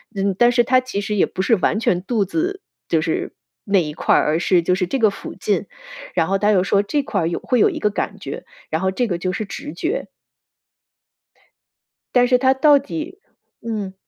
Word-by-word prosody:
嗯， 195 0 0
但 240 0 +6
是 240 0 +4
它 255 +2 +4
其 255 -5 -4
实 210 +1 -3
也 195 - +3
不 185 - -4
是 225 +4 +3
完 195 - +1
全 185 -5 +1
肚 215 -1 0
子， 360 - -2 0.3
就 165 -2 +1
是 160 0 -2 0.3
那 200 -3 +3
一 150 - -5
块 155 - +1
儿， - - +4
而 155 +2 +1
是 175 0 +3
就 180 +2 +1
是 185 -1 -1
这 270 - -1
个 225 -4 +4
附 200 - -8
近。 - - -1 0.5
然 165 -3 +1
后， 195 +1 +1
它 205 +1 +2
又 185 -3 +3
说 200 +1 +2
这 280 +8 -1
块 210 -6 -2
儿 165 - 0
有 170 - -2
会 250 - +1
有 - - +5
一 - - -5
个 210 - +1
感 200 0 -3
觉， 140 - -7 0.2
然 160 +2 -1
后 190 - +1
这 245 +5 -1
个 175 -5 -2
就 185 +1 -2
是 215 - -3
直 165 -5 -7
觉。 355 - -3 2.1
但 245 0 +6
是 250 0 +4
它 260 +1 +3
到 285 +1 +5
底 320 +7 -6 0.4
嗯。 210 -4 -4
205 Hz, 240 characters per minute, -20 LUFS, 185-250 Hz, 2.1 s, 但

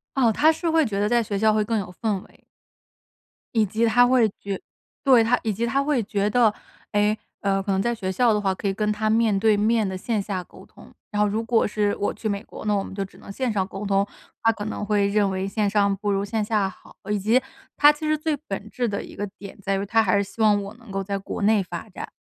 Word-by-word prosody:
哦， 240 -4 +4
他 310 +8 +4
是 330 +1 -2
会 320 -2 +3
觉 200 -3 -2
得 205 - +2
在 240 +1 +3
学 205 -2 -3
校 215 +1 +3
会 215 0 +2
更 225 +1 -1
有 180 -2 -6
氛 210 -4 0
围。 - - -23 1.1
以 220 -2 +4
及 220 +4 0
他 245 +2 +5
会 245 -3 +4
觉 200 -1 -4 0.4
对， 255 -5 +6
他 245 +2 +2
以 220 - 0
及 230 +4 -1
他 270 +4 +1
会 280 -6 +1
觉 205 0 0
得， 225 -2 +4 0.4
诶， 210 +1 +2 0.2
呃， 195 -1 +1
可 200 - -2
能 190 0 +1
在 235 +1 0
学 190 -3 -3
校 235 +4 +3
的 210 - +1
话 195 -2 0
可 200 - -4
以 195 - +1
跟 210 +1 0
他 215 +1 -1
面 220 -2 +3
对 215 -1 +3
面 220 0 +2
地 190 - -4
线 215 +2 -1
下 190 -3 -4
沟 - - -16
通。 - - -17 0.2
然 210 - -3
后 210 - +4
如 220 +3 -1
果 230 0 +2
是 205 -1 0
我 205 - -1
去 220 - -4
美 200 0 -2
国， - - -10
那 210 - +2
我 195 - 0
们 - - -9
就 195 - -2
只 195 - -12
能 200 - -11
线 255 +2 -1
上 195 -3 0
沟 195 +1 -7
通， 195 0 +2 0.4
他 225 - +5
可 210 -1 -6
能 210 - -4
会 205 -1 +2
认 200 -1 +2
为 190 +1 -2
线 205 +1 0
上 200 -1 +2
不 205 +1 -1
如 195 0 0
线 215 +1 -1
下 205 -3 +1
好。 - - -17 0.2
以 210 - +2
及， 225 +6 +3 0.3
他 295 0 +7
其 300 +1 -7
实 310 - +3
最 310 -1 -1
本 200 +2 -5
质 240 +3 -1
的 200 -1 -3
一 - - -11
个 205 - -3
点 200 0 -10
在 195 0 0
于， 200 - -2
他 225 +2 +3
还 195 -1 +2
是 200 - +3
希 210 +3 -8
望 205 -2 +4
我 200 +2 -7
能 235 -4 -14
够 195 0 -2
在 200 +1 -2
国 195 - -6
内 210 -1 +3
发 175 +4 -7
展。 - - -8
210 Hz, 290 characters per minute, -24 LUFS, 200-225 Hz, 1.1 s, 他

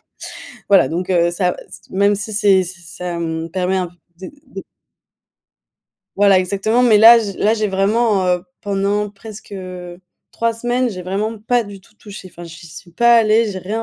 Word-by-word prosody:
ou - - -46 0.7
voilà 190 -9 +5
donc, 180 +3 -4
heu, 175 -1 +2
ça 180 +1 -1
c 185 - -13
t - - -22
même 200 +1 +3
si 210 +2 -5
c'est 200 -3 +3
si 180 0 -9
ça 175 0 -7
me 165 0 -4
permet 185 +2 -1
un 180 -2 -2
peu 175 - -22 0.3
de - - -10 0.2
de - - -9 1.5
Voilà 200 -1 +5
exactement, 200 +6 0
mais 230 -4 +5
là 230 +2 +8
j 205 -4 -4
là 215 - +2
j'ai 215 -2 -1
vraiment 200 +1 +1
heu, 180 -1 +1 0.2
pendant 200 +1 -1
presque, 210 0 -12
heu, 180 -2 -8 0.3
3 230 0 -1
semaines, 245 +2 -1
j'ai 185 -5 -7
vraiment 210 +5 -3
pas 235 +3 0
du 200 -2 -11
tout 200 +3 -25
touché, 205 -3 -11
enfin 175 - -12
j'y 165 0 -12
suis 175 +2 -13
pas 235 +6 +4
allée, 225 0 +3
j'ai 190 - -6
rien 210 +5 -4
195 Hz, 195 wpm, -18 LUFS, 180-215 Hz, 1.5 s, là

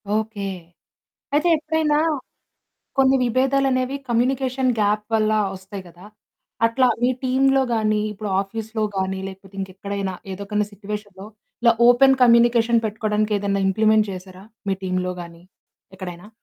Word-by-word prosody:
Okay. 215 -2 -2 0.8
అయితే 300 +4 +2
ఎప్పుడైనా 310 -1 0 1.0
కొన్ని 270 0 +5
విభేదాలనేవి 260 +1 +1
కమ్యూనికేషన్ 255 +2 +1
గ్యాప్ 210 0 +1
వల్ల 215 -1 +2 0.2
వస్తాయి 190 +1 -9
గదా! 175 +2 -15 0.6
అట్లా 250 +3 +3
మీ 245 - +3
టీమ్‌లో 270 +1 +3
గాని 215 -1 +1
ఇప్పుడు 210 0 -6
ఆఫీస్‌లో 220 +2 -4
గాని 190 0 -1
లేకపోతే 195 0 -12
ఇంకెక్కడైనా 195 0 -4 0.2
ఏదో 195 +2 -6
ఒక 210 0 0
సిట్యుయేషన్‌లో 205 -1 -7 0.4
ఇలా 235 -1 +6
ఓపెన్ 265 +2 +6
కమ్యూనికేషన్ 235 -1 +5
పెట్టుకోవడానికి 215 0 -1
ఏదైనా 200 0 -1
ఇంప్లిమెంట్ 215 +1 +3
చేసారా? 185 +1 -10 0.2
మీ 195 - +1
టీమ్‌లో 185 0 -1
గాని 170 0 -13 0.5
ఎక్కడైనా? 180 0 -8
215 Hz, 120 wpm, -22 LUFS, 195-250 Hz, 1.0 s, ఇలా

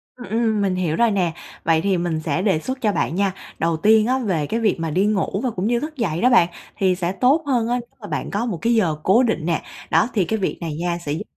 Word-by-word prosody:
Ừm, 245 -5 -10
ừm, 220 -1 +1
mình 195 -2 +1
hiểu 175 -4 -1
rồi 235 +2 +3
nè, 180 -5 0 0.3
vậy 160 -1 +3
thì 195 -2 +1
mình 170 -2 -1
sẽ 155 +2 -1
đề 190 -5 +2
xuất 260 +9 -5
cho 215 - +2
bạn 170 - -1
nha. 195 0 +1 0.3
Đầu 165 0 +1
tiên 215 +5 +4
á 260 +1 +1
về 185 - -1
cái 225 - -1
việc 210 -6 +1
mà 165 -1 -2
đi 185 +6 +1
ngủ 205 -1 0
và 255 - +1
cũng 190 -2 -3
như 240 +1 +2
thức 305 +3 -6
dậy 175 -9 -1
đó 250 - +5
bạn, 235 -9 +5 0.3
thì 190 -3 +2
sẽ 175 -1 -2
tốt 265 - +2
hơn 245 -5 +1
á 240 - 0
nếu 240 - -11
mà 205 - -8
bạn - - -4
có 205 +4 -1
một 215 -8 -3
cái 235 +1 +2
giờ 175 -9 +2
cố 220 +7 +4
định 220 -10 0
nè. 170 -2 0 0.3
Đó, 165 +6 +3
thì 195 -5 +2
cái 220 +5 -1
việc 190 - -2
này 160 -3 -4
nha 170 +2 -2
sẽ 145 - -2
giúp 165 - -4
195 Hz, 285 wpm, -21 LUFS, 170-230 Hz, 0.3 s, đó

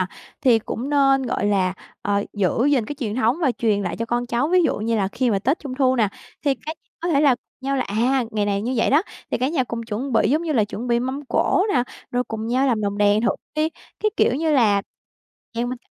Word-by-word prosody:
nà, 185 - +1 0.4
thì 240 -4 +5
cũng 240 +5 -5
nên, 275 -2 +4
gọi 235 -4 -1
là, 190 -2 +1 0.3
ờ, 200 0 0
giữ 205 +3 +1
gìn 255 -6 +2
cái 290 - -4
truyền 215 -6 -3
thống 245 +2 +2
và 265 - +3
truyền 215 -4 0
lại 180 - -3
cho 230 - -2
con 240 +1 -1
cháu. 240 +5 0
Ví 365 0 +4
dụ 320 - +1
như 225 +2 0
là 195 -2 +1
khi 245 +3 0
mà 200 - +2
tết 260 - 0
Trung 275 -3 -6
thu 260 -1 +2
nè, 215 -4 +3 0.4
thì 280 -2 +3
cái 315 - -3 0.3
có 345 - -2
thể 290 -4 +3
là 280 -4 +5
cùng 260 +2 -15
nhau 275 - +1
là, 260 - +1
à, 245 +5 +1
ngày 210 -1 0
này 200 0 0
như 250 +3 -1
vậy - - +2
đó, 295 +4 +5 0.3
thì - - 0
cả 255 +3 +1
nhà 295 -5 0
cùng 235 -1 -5
chuẩn 235 +4 -4
bị, 225 - +3
giống 310 +4 +2
như 325 - -1
là, 225 -7 +3
chuẩn 220 +4 -6
bị 235 0 +2
mâm 265 +3 -3
cỗ 370 - +2
nè, 245 - +4 0.3
rồi 245 0 0
cùng 220 0 -4
nhau 260 +3 +2
làm 225 -4 +1
lồng 200 0 -2
đèn 205 +1 +4
thử 235 - +3 0.3
đi. 310 +1 +2 0.3
Cái 430 - +2
kiểu 245 - +3
như 315 +2 +1
là 210 -8 +4 0.7
nhà 235 +1 -1
mình 250 0 -4
245 Hz, 265 wpm, -22 LUFS, 215-275 Hz, 0.7 s, thì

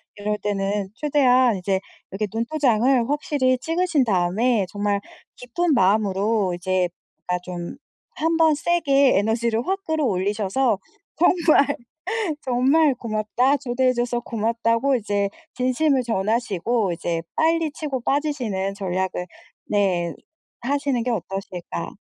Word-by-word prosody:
이럴 210 +1 -2
때는 200 -1 -2
최대한 255 -6 +3
이제 190 +1 0 0.3
이렇게 200 +3 -2
눈도장을 245 0 +2
확실히 280 -3 +1
찍으신 330 -2 +1
다음에 200 +3 +1
정말 205 -1 -1 0.3
기쁜 300 +7 -1
마음으로 200 -1 +2
이제 185 0 0 0.4
아 180 0 +1
좀 175 -1 -6 0.4
한번 325 -1 +3
세게 285 - +3
에너지를 225 - 0
확 390 +1 -1
끌어올리셔서 215 - 0 0.4
"정말, 335 -4 +4 0.8
정말 270 +3 +3
고맙다." 235 +4 0
초대해 255 -1 +1
줘서 240 0 -1
고맙다고 230 +4 0
이제 205 -3 -1 0.3
진심을 255 +2 +1
전하시고 220 -1 0
이제 165 0 -2
빨리 320 -1 +2
치고 285 -4 -4
빠지시는 240 -9 -1
전략을 185 -2 -2 0.4
네 180 -5 +1 0.5
하시는 275 -1 0
게 250 - -2
어떠실까. 190 -5 -5
235 Hz, 270 characters per minute, -23 LUFS, 200-275 Hz, 0.8 s, 정말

